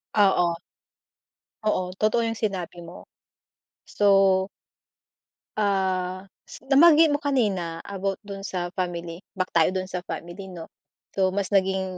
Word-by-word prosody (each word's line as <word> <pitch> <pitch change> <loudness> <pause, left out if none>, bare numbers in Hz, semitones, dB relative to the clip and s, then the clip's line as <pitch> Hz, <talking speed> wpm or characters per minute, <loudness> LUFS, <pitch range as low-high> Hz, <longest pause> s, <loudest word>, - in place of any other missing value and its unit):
Oo. 175 -4 +3 1.1
Oo, 185 -4 0
totoo 215 +4 +1
yung 225 - -1
sinabi 180 -5 -3
mo. 170 +1 -11 0.8
So 195 -2 +3 1.1
Ah, 190 -2 0 0.5
nabanggit 315 +2 +7
mo 290 - +1
kanina 200 - -1
about 195 0 -3
dun 200 -1 -7
sa 180 -2 -4
family, 175 -2 -4 0.2
back 185 -1 -2
tayo 165 +1 +3
dun 185 - -1
sa 180 -1 -4
family 175 +3 -7
'no. 170 -3 -10 0.4
So 190 -1 +1
mas 200 0 -2
naging 190 -1 +2
190 Hz, 120 wpm, -25 LUFS, 180-205 Hz, 1.1 s, nabanggit